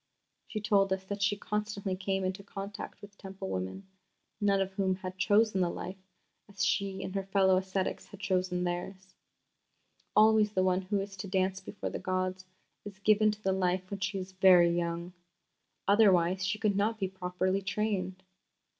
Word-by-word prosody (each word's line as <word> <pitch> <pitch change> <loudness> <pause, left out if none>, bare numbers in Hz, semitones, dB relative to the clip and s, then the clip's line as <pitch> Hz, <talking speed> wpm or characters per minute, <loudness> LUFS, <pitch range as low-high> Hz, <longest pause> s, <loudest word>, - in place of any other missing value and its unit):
She 215 - -4
told 200 -2 +2
us 190 0 0
that 200 +1 -5
she 205 0 +2
constantly 210 -2 -3
came 190 0 -1
into 185 +2 -2
contact 200 +1 -8
with 205 0 -12
Temple 190 - -7
women, 95 - -4 0.6
none 200 -1 +3
of 195 0 -1
whom 190 -1 0
had 185 -1 -7
chosen 210 -1 +3
the 175 - +2
life 190 +2 -7 0.4
as 195 -1 -1
she 195 -1 0
and 185 - -5
her 195 - 0
fellow 190 -1 +4
ascetics 190 0 -2
had 205 - -13
chosen 180 -2 0
theirs. 185 +2 -4 1.0
"Always 215 -1 +5
the 185 - +2
one 185 0 +2
who 200 +2 -1
is 195 0 -7
to 190 - -5
dance 190 0 0
before 195 +1 -6
the - - -4
gods 185 0 -2 0.4
is 200 -2 -9
given 215 +1 +4
to 210 0 -5
the 190 - +2
life 185 0 0
when 200 - -4
she 205 0 -2
is 185 0 -5
very 180 -2 +6
young. 170 +1 -2 0.7
Otherwise 190 -3 +4
she 200 +3 0
could 210 -2 +1
not 215 +3 +1
be 195 -3 -1
properly 185 +1 -1
trained. 195 -2 -2
190 Hz, 175 wpm, -31 LUFS, 185-200 Hz, 1.0 s, very